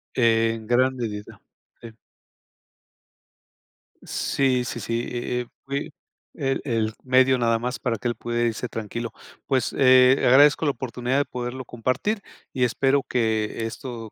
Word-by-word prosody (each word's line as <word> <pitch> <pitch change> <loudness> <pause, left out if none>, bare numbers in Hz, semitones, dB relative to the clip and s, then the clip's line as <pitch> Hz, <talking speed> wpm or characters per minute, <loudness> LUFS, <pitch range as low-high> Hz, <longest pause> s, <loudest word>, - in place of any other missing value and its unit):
En 115 -2 +2
gran 130 +2 +3
medida. 105 -4 -6 0.4
Sí. 115 - -9 2.1
Sí, 130 -2 0
sí, 120 - -5
sí, 115 +2 -2
eh, 125 0 -2
eh, 120 - -8 0.2
fue 140 +1 -4 0.4
el 135 -3 -1
el 115 -5 -1
medio 130 0 +4
nada 115 -1 +1
más 125 +2 -3
para 115 -3 -2
que 125 - -2
él 120 - -1
pudiera 120 0 -1
irse 115 +2 -3
tranquilo. 115 +1 -5 0.3
Pues, 130 -2 0
eh, 130 0 +7
agradezco 145 +5 +6
la 145 - +3
oportunidad 125 +1 -2
de 145 - +1
poderlo 125 +1 -5
compartir 130 - -2 0.3
y 130 - -1
espero 135 +3 +2
que 110 -2 -1
esto 115 -2 -7
125 Hz, 140 wpm, -24 LUFS, 115-130 Hz, 2.1 s, eh